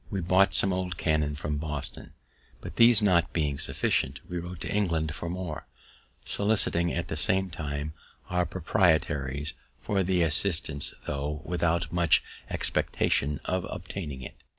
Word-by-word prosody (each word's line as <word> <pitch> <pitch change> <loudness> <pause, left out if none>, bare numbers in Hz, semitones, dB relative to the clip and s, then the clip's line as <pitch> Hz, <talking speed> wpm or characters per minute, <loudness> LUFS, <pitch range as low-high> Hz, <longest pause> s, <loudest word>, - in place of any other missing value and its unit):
We 100 - -2
bought 95 +2 +3
some 95 -1 +3
old 90 -2 -3
cannon 75 -2 0
from 75 0 -3
Boston, 75 -2 -5 0.5
but, - - -9
these 115 -2 +6
not 85 -5 +3
being 75 -4 -1
sufficient, - - 0
we 90 - -4
wrote 90 0 -8
to - - -3
England 80 -7 0
for 85 - -5
more, 90 -3 -5 0.6
soliciting, 100 -5 +1
at 85 - -3
the - - -4
same 95 +4 +1
time, 75 -1 -4 0.3
our 90 -1 0
proprietaries 75 -6 0 0.3
for 100 - -1
some 95 -1 0
assistance, 80 -3 +3
tho' 75 +1 -3
without 85 0 0
much 85 -3 +4 0.3
expectation 75 +2 +1
of 95 0 -1
obtaining 80 -7 -6
it. - - -8
85 Hz, 145 wpm, -28 LUFS, 75-90 Hz, 0.6 s, these